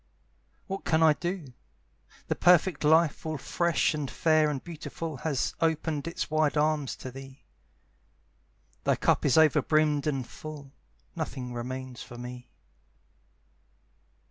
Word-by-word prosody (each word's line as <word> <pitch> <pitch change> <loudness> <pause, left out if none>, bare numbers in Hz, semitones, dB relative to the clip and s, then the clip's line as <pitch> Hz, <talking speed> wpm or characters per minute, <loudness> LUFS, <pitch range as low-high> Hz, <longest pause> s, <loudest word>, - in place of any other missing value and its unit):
What 195 -1 -5
can 160 0 +2
I 155 -1 +7
do? 170 -5 -5 0.7
The - - +1
perfect 180 -2 +4
life 160 +1 +4
All 155 -1 -3
fresh 170 +5 +1
and 150 -3 -3
fair 155 -2 +3
and 140 -3 -3
beautiful 165 -2 -6
Has 140 -1 -1
opened 160 -2 0
its 165 - -4
wide 155 -1 +2
arms 150 -2 +1
to 130 - -8
thee; 135 +1 -11 1.4
Thy - - +3
cup - - +1
is 140 - +3
over 155 -1 +5
brimmed 155 0 +2
and 135 -5 -1
full; 150 -3 -9 0.4
Nothing 125 -2 -4
remains 130 +1 -6
for 120 - -10
me. 125 0 -8
150 Hz, 130 wpm, -28 LUFS, 135-160 Hz, 1.4 s, I